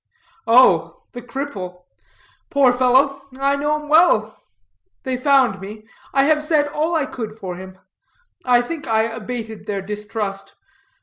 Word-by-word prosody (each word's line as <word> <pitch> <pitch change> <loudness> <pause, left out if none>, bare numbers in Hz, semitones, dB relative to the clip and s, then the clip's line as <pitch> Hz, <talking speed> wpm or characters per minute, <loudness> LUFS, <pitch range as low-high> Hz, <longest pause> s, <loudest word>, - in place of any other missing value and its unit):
"Oh, 175 -9 +4
the 245 - -8
cripple. 210 -9 -6 0.7
Poor 270 -3 +4
fellow. 260 +2 +3 0.2
I 275 +1 +1
know 295 +2 0
him 300 - -11
well. 295 -9 +4 0.7
They 260 -1 -2
found 255 -6 +2
me. 215 +2 -9 0.3
I 270 - +3
have 300 +1 +3
said 300 -1 +2
all 310 +3 -1
I 310 -4 +1
could 220 -4 -7
for 185 -4 -6
him. 185 +1 -11 0.7
I 245 -1 +3
think 320 +4 -6
I 220 -1 +2
abated 225 -1 -6
their 200 -2 -3
distrust. 210 -1 -5
245 Hz, 140 wpm, -20 LUFS, 210-280 Hz, 0.7 s, Oh